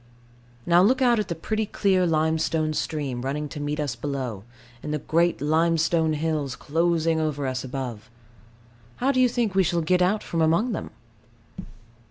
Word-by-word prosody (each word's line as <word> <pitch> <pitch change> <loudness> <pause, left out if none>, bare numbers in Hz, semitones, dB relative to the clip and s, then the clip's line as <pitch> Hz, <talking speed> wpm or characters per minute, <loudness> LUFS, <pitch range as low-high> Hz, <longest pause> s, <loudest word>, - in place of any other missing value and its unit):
Now 175 +1 +5
look 250 +7 +3
out 240 -3 +3
at 210 - -2
the 170 - -3
pretty 215 +6 -2
clear 190 -3 +2
limestone 160 0 +1
stream 145 -5 -3
running 145 +3 -3
to 150 - -7
meet 145 +1 -3
us 145 -5 -2
below, 125 -6 -4 0.4
and 150 - -5
the 150 - 0
great 170 +3 +1
limestone 160 +1 +2
hills 150 -3 -2
closing 165 +1 0
over 150 -3 -2
us 130 -1 -2
above. 125 -4 -6 0.9
How 265 +2 +1
do 255 -2 +2
you 250 - +5
think 235 -4 -1
we 190 - +4
shall 170 -1 +1
get 180 +3 +2
out 195 +4 +2
from 165 - -2
among 170 +10 +2
them? - - -4
160 Hz, 170 wpm, -25 LUFS, 145-180 Hz, 0.9 s, Now